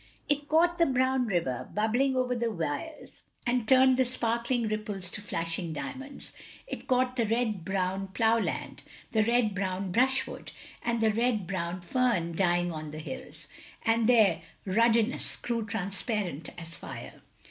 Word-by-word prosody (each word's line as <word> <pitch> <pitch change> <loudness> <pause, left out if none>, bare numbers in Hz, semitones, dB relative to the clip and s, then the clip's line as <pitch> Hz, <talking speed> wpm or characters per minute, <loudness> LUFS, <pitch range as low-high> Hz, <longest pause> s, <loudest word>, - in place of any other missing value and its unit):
It 290 0 0
caught 345 +3 +3
the 335 - +5
brown 260 -1 +2
river, 170 - -1
bubbling 240 +6 +2
over 255 -1 +1
the 235 -1 0
weirs, 180 - -5 0.2
and 245 -2 +1
turned 260 -1 +6
the 260 - +5
sparkling 235 -1 0
ripples 210 -4 -3
to 215 - -6
flashing 165 -3 -3
diamonds; 265 - -7 0.3
it - - -7
caught 255 0 +2
the 230 -3 +2
red 220 -5 0
brown 190 +1 -1
plough 225 +3 +2
land, - - -3 0.3
the 220 -1 +3
red 230 -1 +2
brown 190 -1 -2
brushwood, 260 +6 +1 0.3
and 235 -1 0
the 220 -1 +4
red 230 -3 +1
brown 180 -1 -3
fern 175 -5 +1
dying 175 -1 +2
on 155 -1 -5
the 150 - -8
hills, 260 +12 -8 0.2
— - - -21
^and 225 0 +3
their 215 -9 +5 0.2
ruddiness 230 +4 +2
grew 235 -2 -2
transparent 195 - -2
as 165 0 -9
fire. - - -9
225 Hz, 155 wpm, -29 LUFS, 185-250 Hz, 0.3 s, turned